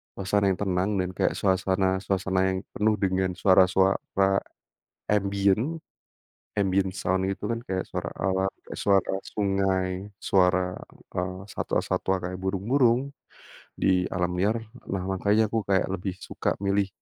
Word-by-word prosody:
suasana 100 Hz, +1 st, +1 dB
yang 90 Hz, -, -3 dB
tenang, 95 Hz, -1 st, 0 dB
dan 90 Hz, 0 st, 0 dB
kayak -, -, +2 dB
suasana-suasana 95 Hz, 0 st, +1 dB, 0.2 s
yang -, -, -2 dB, 0.2 s
penuh 105 Hz, +1 st, +2 dB
dengan 95 Hz, -1 st, +1 dB
suara-suara 95 Hz, +1 st, +3 dB, 0.7 s
ambient, 100 Hz, +8 st, +1 dB, 0.8 s
ambient 95 Hz, -1 st, +2 dB
sound 95 Hz, -1 st, 0 dB
gitu 100 Hz, +1 st, -4 dB
kan, 115 Hz, 0 st, -1 dB
kayak 95 Hz, -1 st, -2 dB
suara 90 Hz, -2 st, -4 dB
alam, 95 Hz, +1 st, +1 dB, 0.2 s
kek -, -, -7 dB
suara 100 Hz, -2 st, +3 dB, 0.2 s
sungai, 95 Hz, -2 st, +1 dB, 0.3 s
suara, 90 Hz, -1 st, +2 dB, 0.4 s
eee, 90 Hz, +1 st, -3 dB
satwa-satwa 95 Hz, -, 0 dB, 0.2 s
kayak 90 Hz, -, -6 dB
burung-burung, 120 Hz, +7 st, +2 dB, 0.7 s
di 90 Hz, -1 st, +3 dB
alam 90 Hz, 0 st, 0 dB
liar. 105 Hz, +5 st, +2 dB, 0.4 s
Nah 95 Hz, -, -1 dB
makanya 105 Hz, +3 st, +2 dB
aku 115 Hz, 0 st, 0 dB
kayak 95 Hz, -1 st, +3 dB
lebih 95 Hz, 0 st, -3 dB
suka -, -, -3 dB, 0.2 s
milih, 100 Hz, 0 st, +2 dB
95 Hz, 125 wpm, -26 LUFS, 95-100 Hz, 0.8 s, suara-suara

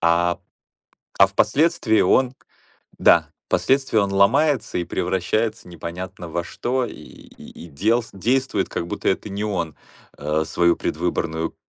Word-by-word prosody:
а, 85 Hz, +1 st, +2 dB, 0.8 s
а 95 Hz, -, +8 dB
впоследствии 110 Hz, -, +2 dB
он 130 Hz, 0 st, +3 dB, 0.6 s
да, -, -, +5 dB, 0.2 s
впоследствии 135 Hz, -4 st, +2 dB
он 100 Hz, -1 st, +1 dB
ломается 125 Hz, +6 st, +2 dB
и 85 Hz, -, -1 dB
превращается 95 Hz, +5 st, -1 dB
непонятно 85 Hz, +1 st, -7 dB
во 85 Hz, +1 st, -3 dB
что, 125 Hz, +7 st, -2 dB
и -, -, -8 dB
и -, -, -13 dB
и -, -, -13 dB
делс 110 Hz, +10 st, 0 dB
действует 130 Hz, +7 st, 0 dB
как 85 Hz, -, -4 dB
будто -, -, -3 dB
это -, -, -1 dB
не 100 Hz, +2 st, -3 dB
он, 90 Hz, -7 st, -2 dB, 0.4 s
э, 75 Hz, +2 st, 0 dB
свою 85 Hz, 0 st, +2 dB
предвыборную 80 Hz, 0 st, -2 dB
95 Hz, 135 wpm, -22 LUFS, 85-115 Hz, 0.8 s, а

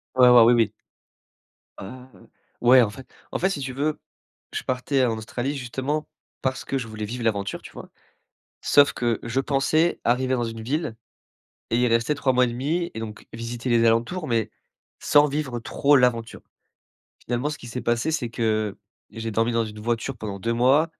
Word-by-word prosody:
Ouais 125 Hz, -1 st, +7 dB
ouais, 125 Hz, -1 st, +8 dB
oui 120 Hz, +2 st, +6 dB
oui. 115 Hz, -2 st, +2 dB, 1.1 s
Heu, 95 Hz, -, -7 dB, 0.7 s
ouais 125 Hz, +1 st, +7 dB
en 115 Hz, -, +2 dB
fait. 130 Hz, +5 st, -11 dB, 0.2 s
En -, -, -1 dB
fait 190 Hz, -, +2 dB
si 195 Hz, -, -3 dB
tu 130 Hz, -2 st, -4 dB
veux, 150 Hz, +3 st, -1 dB, 0.5 s
je -, -, -4 dB
partais 130 Hz, +1 st, 0 dB
en 115 Hz, -2 st, -1 dB
Australie 120 Hz, +5 st, -3 dB
justement 135 Hz, +4 st, -3 dB, 0.3 s
parce 130 Hz, 0 st, -2 dB
que 135 Hz, -, -1 dB
je 120 Hz, -3 st, -4 dB
voulais 110 Hz, -1 st, -5 dB
vivre 120 Hz, +3 st, -5 dB
l'aventure 100 Hz, -3 st, -1 dB
tu -, -, -12 dB
vois? -, -, -11 dB, 0.7 s
Sauf 145 Hz, 0 st, +5 dB
que 120 Hz, -2 st, -1 dB
je 120 Hz, +3 st, -1 dB
pensais 145 Hz, +5 st, +1 dB
arriver 130 Hz, +2 st, +1 dB
dans 120 Hz, -2 st, 0 dB
une 115 Hz, -1 st, -5 dB
ville 140 Hz, +1 st, -2 dB, 0.8 s
et 115 Hz, -, +2 dB
y 125 Hz, 0 st, +3 dB
rester 115 Hz, +4 st, +2 dB
3 135 Hz, -2 st, +1 dB
mois 125 Hz, 0 st, +4 dB
et -, -, -1 dB
demi 145 Hz, +9 st, -2 dB
et -, -, -6 dB
donc 110 Hz, -1 st, -8 dB
visiter 115 Hz, +2 st, -5 dB
les 115 Hz, -1 st, +4 dB
alentours, 120 Hz, +10 st, +1 dB
mais 115 Hz, -3 st, 0 dB, 0.5 s
sans 145 Hz, 0 st, +4 dB
vivre 140 Hz, -4 st, -3 dB
trop 140 Hz, +5 st, +2 dB
l'aventure. 120 Hz, -3 st, 0 dB, 0.8 s
Finalement 125 Hz, +5 st, -1 dB
ce 150 Hz, -, -6 dB
qui -, -, -11 dB
s'est 125 Hz, +2 st, -5 dB
passé, 120 Hz, +6 st, 0 dB
c'est 145 Hz, -7 st, -2 dB
que 110 Hz, -3 st, -1 dB, 0.3 s
j'ai 115 Hz, 0 st, -5 dB
dormi 115 Hz, +2 st, +1 dB
dans 115 Hz, 0 st, +1 dB
une 105 Hz, 0 st, -9 dB
voiture 120 Hz, +3 st, -2 dB
pendant 105 Hz, -3 st, -6 dB
2 115 Hz, +4 st, -1 dB
mois. 135 Hz, +7 st, +3 dB
120 Hz, 190 wpm, -24 LUFS, 115-135 Hz, 1.1 s, ouais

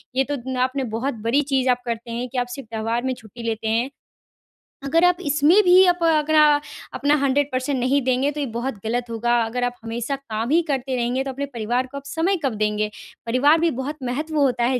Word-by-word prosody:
ये 265 Hz, -, +3 dB
तो 290 Hz, -, +1 dB
न 260 Hz, -1 st, -3 dB
आपने 270 Hz, +1 st, -3 dB
बहुत 270 Hz, +4 st, -1 dB
बड़ी 240 Hz, +6 st, +2 dB
चीज़ 270 Hz, -2 st, 0 dB
आप 245 Hz, 0 st, +2 dB
करते 235 Hz, 0 st, -4 dB
हैं 240 Hz, +2 st, -3 dB
कि 255 Hz, -, -6 dB
आप 245 Hz, 0 st, 0 dB
सिर्फ 275 Hz, -4 st, -9 dB
त्योहार 225 Hz, +2 st, -2 dB
में 260 Hz, 0 st, 0 dB
छुट्टी 230 Hz, 0 st, -12 dB
लेते 225 Hz, -1 st, -2 dB
हैं। 230 Hz, +4 st, +1 dB, 0.9 s
अगर 325 Hz, +5 st, +2 dB
आप 360 Hz, 0 st, +4 dB
इसमें 300 Hz, +7 st, +4 dB
भी 370 Hz, +1 st, +7 dB
आप 355 Hz, 0 st, +2 dB
अगर 310 Hz, -1 st, +2 dB
आ 300 Hz, -1 st, +6 dB, 0.3 s
अपना 290 Hz, +1 st, +2 dB
100% 280 Hz, 0 st, +1 dB
परसेंट 260 Hz, +2 st, -1 dB
नहीं 260 Hz, +3 st, +2 dB
देंगे, 260 Hz, +2 st, +1 dB
तो 295 Hz, -, -6 dB
ये 285 Hz, -, 0 dB
बहुत 250 Hz, +2 st, -2 dB
गलत 240 Hz, +1 st, -2 dB
होगा। 240 Hz, +1 st, +1 dB
अगर 240 Hz, +2 st, -3 dB
आप 245 Hz, 0 st, -1 dB
हमेशा 230 Hz, +4 st, -3 dB
काम 230 Hz, -4 st, -4 dB
ही 335 Hz, +3 st, +4 dB
करते 270 Hz, -2 st, -1 dB
रहेंगे, 245 Hz, +2 st, 0 dB
तो 270 Hz, -, -4 dB
अपने 280 Hz, +2 st, -4 dB
परिवार 240 Hz, +3 st, -1 dB
को 280 Hz, -, -9 dB
आप 280 Hz, -, -8 dB
समय 335 Hz, +6 st, 0 dB
कब 260 Hz, -, 0 dB
देंगे? 210 Hz, 0 st, 0 dB, 0.4 s
परिवार 280 Hz, +7 st, +4 dB
भी 335 Hz, 0 st, +2 dB
बहुत 285 Hz, +3 st, -4 dB
महत्व 300 Hz, +6 st, -3 dB
होता 255 Hz, -4 st, +2 dB
है 250 Hz, +1 st, +1 dB
260 Hz, 225 wpm, -22 LUFS, 240-290 Hz, 0.9 s, भी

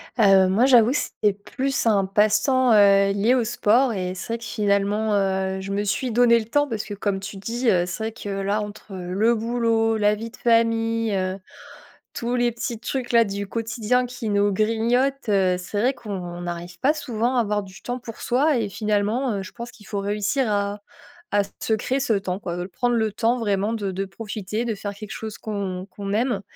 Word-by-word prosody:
Heu, 195 Hz, -5 st, +5 dB
moi, 200 Hz, +7 st, +3 dB
j'avoue, 245 Hz, -3 st, +6 dB
c'est 210 Hz, -7 st, 0 dB
plus 260 Hz, +7 st, -3 dB
un 205 Hz, -4 st, +3 dB
passe-temps, 215 Hz, +5 st, +3 dB
heu, 200 Hz, -1 st, +5 dB
lié 205 Hz, +5 st, +2 dB
au 250 Hz, -, +2 dB
sport 230 Hz, +3 st, +2 dB
et 185 Hz, -2 st, -3 dB
c'est 225 Hz, -, -5 dB
vrai 230 Hz, -, -1 dB
que 230 Hz, -, -13 dB
finalement, 210 Hz, 0 st, 0 dB
heu, 190 Hz, -1 st, 0 dB
je 195 Hz, +1 st, -6 dB
me 205 Hz, +1 st, 0 dB
suis 240 Hz, +5 st, -1 dB
donnée 235 Hz, 0 st, +5 dB
le 220 Hz, -, -5 dB
temps 290 Hz, +6 st, +1 dB
parce 225 Hz, -5 st, -3 dB
que 205 Hz, -, -6 dB
comme 200 Hz, -1 st, -2 dB
tu 195 Hz, +1 st, -7 dB
dis, 235 Hz, +5 st, -1 dB
heu, 175 Hz, -3 st, +3 dB
c'est 200 Hz, +4 st, -5 dB
vrai 225 Hz, -, -2 dB
que 210 Hz, -2 st, -8 dB
là 200 Hz, +2 st, -1 dB
entre 210 Hz, 0 st, -8 dB
le 190 Hz, +6 st, +1 dB
boulot, 225 Hz, -1 st, +1 dB
la 210 Hz, 0 st, +3 dB
vie 225 Hz, +2 st, -7 dB
de -, -, -15 dB
famille, 230 Hz, -1 st, +2 dB
heu, 185 Hz, 0 st, -1 dB, 0.8 s
tous 235 Hz, +1 st, -2 dB
les 245 Hz, -1 st, +2 dB
petits 235 Hz, -1 st, -4 dB
trucs-là 240 Hz, -2 st, +1 dB
du 200 Hz, 0 st, -4 dB
quotidien 230 Hz, +3 st, 0 dB
qui 245 Hz, -2 st, -6 dB
nous 205 Hz, 0 st, +2 dB
grignotent, 230 Hz, +6 st, +1 dB
heu, 190 Hz, -3 st, +3 dB
c'est 185 Hz, +3 st, -4 dB
vrai 255 Hz, +5 st, +2 dB
qu'on 185 Hz, -7 st, -6 dB
n'arrive 175 Hz, 0 st, -6 dB
pas 290 Hz, +3 st, +3 dB
souvent 245 Hz, -4 st, -1 dB
à -, -, +4 dB
avoir 210 Hz, -2 st, 0 dB
du 190 Hz, -1 st, -13 dB
temps 245 Hz, +1 st, -3 dB
pour 230 Hz, -2 st, -9 dB
soi. 275 Hz, +3 st, +2 dB
Et 220 Hz, -3 st, -1 dB
finalement, 215 Hz, +4 st, 0 dB
heu, 195 Hz, -, -3 dB
je 185 Hz, -, -10 dB
pense 235 Hz, 0 st, -8 dB
qu'il 210 Hz, -, -17 dB
faut 205 Hz, -2 st, -3 dB
réussir 210 Hz, +5 st, 0 dB
à 205 Hz, 0 st, -1 dB, 0.5 s
à 205 Hz, -, +4 dB, 0.2 s
se 220 Hz, -, +1 dB
créer 255 Hz, +5 st, -1 dB
ce 240 Hz, -4 st, +1 dB
temps 195 Hz, -1 st, -2 dB
quoi, 175 Hz, -3 st, -4 dB
de 175 Hz, -, -3 dB
prendre 240 Hz, +6 st, 0 dB
le 220 Hz, -2 st, 0 dB
temps 235 Hz, +4 st, +1 dB
vraiment 205 Hz, -1 st, 0 dB
de 205 Hz, -4 st, -2 dB
de 195 Hz, +2 st, -2 dB
profiter, 210 Hz, +1 st, -5 dB
de 230 Hz, -2 st, -1 dB
faire 205 Hz, 0 st, -5 dB
quelque 205 Hz, 0 st, -9 dB
chose 220 Hz, -2 st, -6 dB
qu'on 195 Hz, -3 st, -4 dB
qu'on 200 Hz, +1 st, -6 dB
aime. 230 Hz, -1 st, +1 dB
215 Hz, 210 wpm, -23 LUFS, 200-235 Hz, 0.8 s, j'avoue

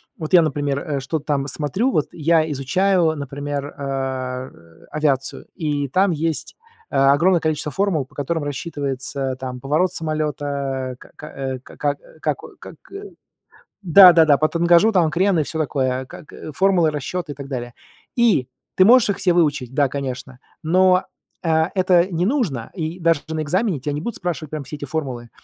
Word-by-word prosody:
вот 155 Hz, -2 st, -6 dB
я, 175 Hz, -2 st, +8 dB
например, 145 Hz, -3 st, -1 dB
э, 145 Hz, -3 st, -3 dB
что-то 145 Hz, +3 st, -4 dB
там 140 Hz, -2 st, -1 dB
смотрю, 155 Hz, -, -1 dB
вот 150 Hz, -, +1 dB
я 160 Hz, 0 st, +2 dB
изучаю, 165 Hz, +4 st, +1 dB
например, 145 Hz, 0 st, -5 dB
а, 130 Hz, -2 st, -3 dB
э, 85 Hz, 0 st, -20 dB
авиацию, 140 Hz, -3 st, -1 dB
и 145 Hz, -4 st, -2 dB
там 190 Hz, +7 st, +2 dB
есть 160 Hz, -1 st, -2 dB, 0.4 s
э, -, -, -5 dB
огромное 145 Hz, +7 st, +4 dB
количество 155 Hz, -2 st, -2 dB
формул, 185 Hz, -2 st, 0 dB
по -, -, -25 dB
которым 160 Hz, +3 st, -2 dB
рассчитывается, 140 Hz, -2 st, -3 dB
там, 125 Hz, -1 st, -6 dB
поворот 155 Hz, +7 st, +1 dB
самолета, 145 Hz, -4 st, -3 dB
к -, -, -16 dB
к -, -, -15 dB
э, 135 Hz, -1 st, -5 dB
ка 125 Hz, -, -16 dB
как, 145 Hz, -1 st, -1 dB, 0.2 s
как, -, -, -1 dB, 0.2 s
как, -, -, -11 dB, 1.1 s
да-да-да, 170 Hz, -4 st, +8 dB
по 155 Hz, +2 st, +1 dB
тангажу, 170 Hz, +5 st, +4 dB
там, 180 Hz, -6 st, +3 dB
крен 185 Hz, +1 st, +2 dB
и 155 Hz, -, +2 dB
всё 160 Hz, +2 st, -4 dB
такое, 130 Hz, -3 st, -1 dB
как, 145 Hz, -, -13 dB
э, -, -, -8 dB
формулы 180 Hz, -1 st, +3 dB
расчета 150 Hz, +2 st, -4 dB
и -, -, -9 dB
так 140 Hz, -1 st, -8 dB
далее. 120 Hz, -3 st, -5 dB, 0.4 s
И 220 Hz, -, +3 dB, 0.3 s
ты 185 Hz, -, +5 dB
можешь 235 Hz, 0 st, +6 dB
их 200 Hz, -, -2 dB
все 180 Hz, -, +2 dB
выучить, 145 Hz, -7 st, +1 dB
да, 140 Hz, +1 st, +2 dB
конечно, 130 Hz, -2 st, -6 dB, 0.2 s
но, 185 Hz, +3 st, +4 dB, 0.4 s
э, 160 Hz, -1 st, +2 dB
это 185 Hz, -1 st, +3 dB
не 170 Hz, +2 st, 0 dB
нужно. 195 Hz, -, -1 dB
И 165 Hz, -1 st, -4 dB
даже 165 Hz, -3 st, +2 dB
на 160 Hz, -1 st, -2 dB
экзамене 185 Hz, +3 st, 0 dB
тя 145 Hz, +3 st, -3 dB
не 145 Hz, -, -3 dB
будут 230 Hz, +7 st, -5 dB
спрашивать 170 Hz, -4 st, -4 dB
прям 155 Hz, -2 st, -5 dB
все 135 Hz, -, -9 dB
эти 145 Hz, -, -6 dB
формулы. 130 Hz, -6 st, -4 dB
150 Hz, 175 wpm, -21 LUFS, 135-170 Hz, 1.1 s, я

